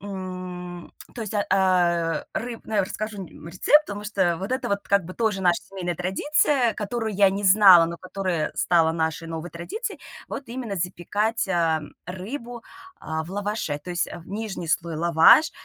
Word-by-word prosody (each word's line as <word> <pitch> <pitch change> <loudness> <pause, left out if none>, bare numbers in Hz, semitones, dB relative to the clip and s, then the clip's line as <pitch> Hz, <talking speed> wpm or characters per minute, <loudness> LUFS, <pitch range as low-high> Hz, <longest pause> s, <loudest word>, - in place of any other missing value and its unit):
м, 185 -2 -7 0.2
то 235 - -5
есть, 215 0 -6
а 205 -1 +1
а, 175 -3 +2
ры 235 -1 -4
ну, 220 - -6
я 200 - +3
расскажу 210 +1 -5
р - - -12 0.2
рецепт, 295 - +4
потому 205 0 -6
что 190 -5 +1
вот 195 +8 -4
это 260 - -1
вот 200 0 0
как 200 -2 +3
бы 185 - -8
тоже 215 -4 0
наша 175 -1 +3
семейная 180 -3 -5
традиция, 245 +6 +1
которую 220 +1 -3
я 195 0 +5
не 200 +1 -3
знала, 190 -3 +8
но 170 0 -5
которая 185 -3 -2
стала 165 -2 +3
нашей 160 0 -2
новой 165 +1 -5
традицией 415 - -5 0.3
вот 275 - -5
именно 235 -5 -5
запекать, 205 +6 -1
ам, 165 -4 0
рыбу, 235 +6 -7 0.4
а, 160 0 -3
в 170 - -11
лаваше, 205 -7 -2
то 180 - -9
есть 175 -1 -1
в 170 - -10
нижний 200 -5 -5
слой 165 0 0
лаваш, 170 - +6
190 Hz, 175 wpm, -24 LUFS, 170-215 Hz, 0.4 s, знала